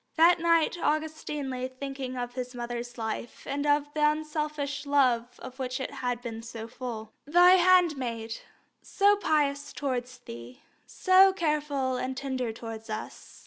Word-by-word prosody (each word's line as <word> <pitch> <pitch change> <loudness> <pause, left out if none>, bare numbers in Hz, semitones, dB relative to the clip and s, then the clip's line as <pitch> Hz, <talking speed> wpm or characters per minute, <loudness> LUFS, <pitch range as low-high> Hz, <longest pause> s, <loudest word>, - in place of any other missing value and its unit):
That 340 +2 +6
night 335 0 +2
Augustine 305 -2 -2
lay 255 0 -3
thinking 260 0 -6
of 245 0 -4
his 250 0 -5
mother's 240 0 -5
life 225 +1 -5
and 285 +1 -2
the 290 0 +3
unselfish 300 -1 -1
love 250 -4 +2
of 260 +1 -9
which 255 0 -3
it 265 - -4
had 245 -1 -3
been 225 -2 -5
so 225 -1 -7
full. 230 -3 -7
"Thy 350 +4 +7
handmaid, 305 -12 +3 0.4
so 405 +1 +3
pious 290 -6 0
towards 255 -2 -3
Thee, 120 - -11 0.2
so 380 +1 +5
careful 295 -6 0
and 255 +1 -3
tender 260 -3 -2
towards 225 0 -8
us. 215 0 -7
265 Hz, 145 wpm, -28 LUFS, 245-300 Hz, 0.4 s, Thy